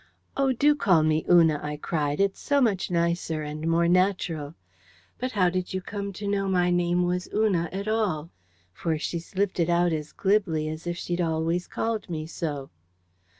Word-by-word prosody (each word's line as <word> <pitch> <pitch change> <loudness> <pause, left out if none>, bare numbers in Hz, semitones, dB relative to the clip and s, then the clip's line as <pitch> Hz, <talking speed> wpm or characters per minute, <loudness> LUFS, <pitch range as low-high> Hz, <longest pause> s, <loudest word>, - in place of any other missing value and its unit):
"Oh, 275 -1 +2
do 290 +4 +4
call 185 - +3
me 155 0 +2
Una!" 165 -4 +5
I 150 0 -4
cried; 150 -1 -2
"it's 195 0 +1
so 285 0 +1
much 215 -8 +1
nicer 170 -2 0
and 150 +2 -5
more 170 +1 +3
natural.... 175 -4 +1 0.6
But 255 +1 -3
how 185 -4 +3
did 185 0 -3
you 185 - -1
come 200 +1 -5
to 205 +2 -6
know 200 -1 0
my 180 -2 +2
name 175 0 +2
was 180 +1 -1
Una 190 -6 +1
at 195 +2 -4
all?" 195 -8 -1 0.4
For 160 - -1
she 170 +2 -3
slipped 190 +3 -2
it 170 0 +2
out 175 0 +3
as 150 -1 -4
glibly 190 -6 +1
as 155 +2 -6
if 175 0 -2
she'd 175 0 -2
always 165 +1 0
called 225 -4 -3
me 155 -2 -3
so. 150 -4 -5
175 Hz, 185 wpm, -26 LUFS, 160-195 Hz, 0.6 s, Una